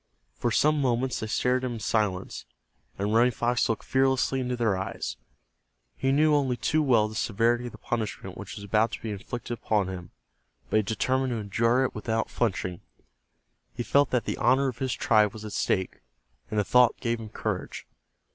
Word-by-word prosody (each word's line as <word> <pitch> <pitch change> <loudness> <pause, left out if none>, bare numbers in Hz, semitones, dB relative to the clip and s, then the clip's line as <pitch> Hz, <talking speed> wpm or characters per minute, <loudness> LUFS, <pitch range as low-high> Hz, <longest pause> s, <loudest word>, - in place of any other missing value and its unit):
For 120 - -1
some 150 +6 +3
moments 125 0 0
they 110 - -4
stared 125 +4 +1
at - - 0
him 120 - -4
in - - -6
silence, 105 -3 -1 0.5
and 100 +2 -1
Running 120 +2 +5
Fox 120 +1 0
looked 115 - -1
fearlessly 130 0 +2
into 125 -1 -1
their 115 -5 +1
eyes. 95 -9 -4 0.8
He 135 - 0
knew 150 +2 +4
only 135 -4 +2
too 155 +6 +1
well 120 -7 +3
the 110 - -9
severity 115 +3 +1
of - - -7
the - - -12
punishment 105 -5 -4
which 100 0 -8
was 100 - -8
about 105 +3 +2
to - - -5
be 110 - -3
inflicted 120 +4 -5
upon 105 -4 0
him, 90 -2 -7 0.6
but - - +4
he - - +5
determined 130 +6 0
to - - -1
endure 115 +4 +1
it 130 - -1
without 110 +1 -2
flinching. 90 -6 -1 0.9
He 120 - -2
felt 140 +2 +3
that 125 -2 0
the - - -2
honor 135 +1 +3
of 125 - -8
his 130 -1 -1
tribe 105 -3 +3
was 110 0 -9
at 105 - -7
stake, 95 -2 -1 0.5
and 105 - 0
the - - +3
thought 125 +3 +4
gave 115 0 -1
him 110 -1 -8
courage. - - -4
115 Hz, 195 wpm, -27 LUFS, 105-125 Hz, 0.9 s, Running